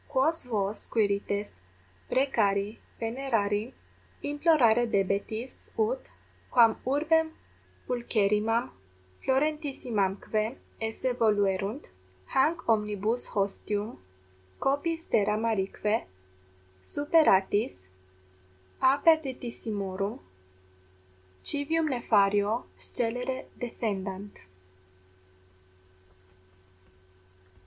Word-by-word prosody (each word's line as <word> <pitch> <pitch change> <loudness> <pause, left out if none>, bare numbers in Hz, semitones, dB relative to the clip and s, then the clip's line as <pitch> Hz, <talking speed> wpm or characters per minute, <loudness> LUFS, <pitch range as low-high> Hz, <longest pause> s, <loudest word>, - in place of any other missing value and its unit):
Quos 295 +3 +2
vos, 210 -3 -2
Quirites, 200 - -1 0.5
precari, 215 -6 +1 0.2
venerari, 225 -2 -1 0.5
implorare 285 -6 +4
debetis, 205 +4 -2
ut, 470 +3 +1 0.5
quam 230 -3 +6
urbem 320 +4 +2 0.6
pulcherrimam 225 -2 +1 0.5
florentissimamque 255 - 0 0.2
esse 225 +3 -1
voluerunt, 205 0 +1 0.5
hanc 310 +6 +2
omnibus 210 +1 +1
hostium 205 +2 -2 0.6
copiis 325 +4 0
terra 210 -1 +2
marique 215 0 0 0.7
superatis 205 - +2 1.0
a 265 +1 +5
perditissimorum 225 - 0 1.2
civium 315 +3 +1
nefario 210 -4 +2
scelere 250 +3 -2
defendant. 200 -4 -4
225 Hz, 60 wpm, -29 LUFS, 205-270 Hz, 1.2 s, quam